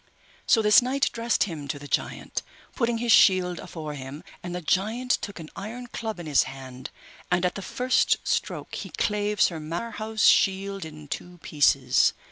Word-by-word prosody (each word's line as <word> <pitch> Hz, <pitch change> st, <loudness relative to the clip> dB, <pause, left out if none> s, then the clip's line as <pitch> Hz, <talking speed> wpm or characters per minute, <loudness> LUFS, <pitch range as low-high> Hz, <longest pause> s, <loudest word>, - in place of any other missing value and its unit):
So 225 Hz, -, +4 dB
this 210 Hz, +4 st, +7 dB
knight 265 Hz, +3 st, 0 dB
dressed 230 Hz, 0 st, +1 dB
him 160 Hz, -7 st, -5 dB
to 140 Hz, -, -3 dB
the 145 Hz, 0 st, -10 dB
giant, -, -, -2 dB, 0.3 s
putting 235 Hz, -2 st, 0 dB
his 235 Hz, 0 st, 0 dB
shield 185 Hz, -4 st, +5 dB
afore 155 Hz, -3 st, -7 dB
him, 140 Hz, +2 st, -8 dB, 0.2 s
and 175 Hz, 0 st, -5 dB
the -, -, -2 dB
giant 215 Hz, +9 st, 0 dB
took 200 Hz, -6 st, -1 dB
an 155 Hz, -1 st, -9 dB
iron 225 Hz, +5 st, -6 dB
club 225 Hz, -4 st, -5 dB
in 170 Hz, -, -7 dB
his 145 Hz, -3 st, +4 dB
hand, 130 Hz, -1 st, -9 dB, 0.4 s
and 180 Hz, 0 st, +2 dB
at 180 Hz, -, +1 dB
the 200 Hz, -, -6 dB
first 250 Hz, +6 st, +1 dB
stroke -, -, -2 dB
he -, -, -5 dB
clave 210 Hz, 0 st, -1 dB
Sir 165 Hz, -3 st, +3 dB
Marhaus' 215 Hz, +7 st, -2 dB
shield 195 Hz, -1 st, +3 dB
in 155 Hz, -1 st, -10 dB
two 175 Hz, +5 st, -6 dB
pieces. 135 Hz, -4 st, +3 dB
185 Hz, 175 wpm, -26 LUFS, 155-220 Hz, 0.4 s, this